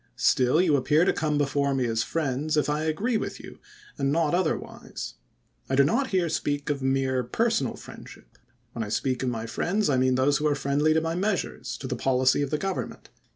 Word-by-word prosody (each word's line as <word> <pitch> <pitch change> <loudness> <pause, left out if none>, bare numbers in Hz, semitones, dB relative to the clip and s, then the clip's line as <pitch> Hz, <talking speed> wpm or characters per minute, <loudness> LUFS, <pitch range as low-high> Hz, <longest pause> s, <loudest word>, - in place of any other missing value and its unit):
Still 130 +4 +3
you 165 -5 +4
appear 150 +5 +3
to - - +3
come 150 -2 0
before 140 -1 +1
me 130 -2 +1
as 115 -1 -1
my - - -2
friends, 155 0 -1
if 150 0 +2
I 150 +1 -1
agree 210 +10 0
with - - -5
you, - - -11 0.4
and 135 0 +1
not 160 0 +1
otherwise. 175 -3 -3 0.6
I 135 - +1
do 140 - +6
not 240 - +1
here 185 -5 +1
speak 145 -2 -1
of 140 -1 -3
mere 135 -1 +1
personal 220 - 0
friendship, - - -13 0.4
^^^len 115 - -2
I 105 - -6
speak 130 +3 -1
of 130 - 0
my 115 -2 -4
friends 180 - 0
I 130 - +2
mean 130 0 +2
those 135 +2 +3
who 150 - 0
are 145 - +2
friendly 145 +3 +1
to 160 - +3
my 165 0 -2
measui'es, 195 +1 -2
to - - -9
the - - -2
policy 130 +1 +2
of 140 - -1
the 150 - 0
Government. 195 +3 -4
145 Hz, 215 wpm, -26 LUFS, 130-160 Hz, 0.6 s, do